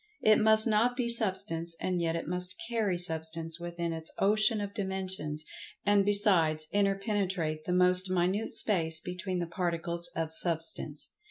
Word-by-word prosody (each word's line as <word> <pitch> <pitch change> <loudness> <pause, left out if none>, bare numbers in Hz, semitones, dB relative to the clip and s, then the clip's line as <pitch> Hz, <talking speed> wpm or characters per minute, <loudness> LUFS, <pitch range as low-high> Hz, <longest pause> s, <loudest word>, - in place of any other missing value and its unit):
It 215 0 +5
must 220 0 +4
not 235 +2 +1
be 250 -2 -1
Substance, 185 -7 0
and 180 -2 -2
yet 165 -1 -1
it 165 - -4
must 180 +1 -3
carry 220 -6 -1
Substance 165 -1 0
within 170 -1 -4
its 160 0 -5
ocean 215 +2 +2
of 205 -1 -5
dimensions, 190 -6 -4 0.4
and, 205 -1 +4
besides, 185 -7 +4
interpenetrate 195 -6 -1
the - - -3
most 180 +1 +3
minute 185 +4 -1
space 165 -6 +2
between 180 +1 -5
the 175 - -2
particles 170 0 -2
of 160 -1 -2
Substance. 160 -3 -2
180 Hz, 150 wpm, -29 LUFS, 165-205 Hz, 0.4 s, It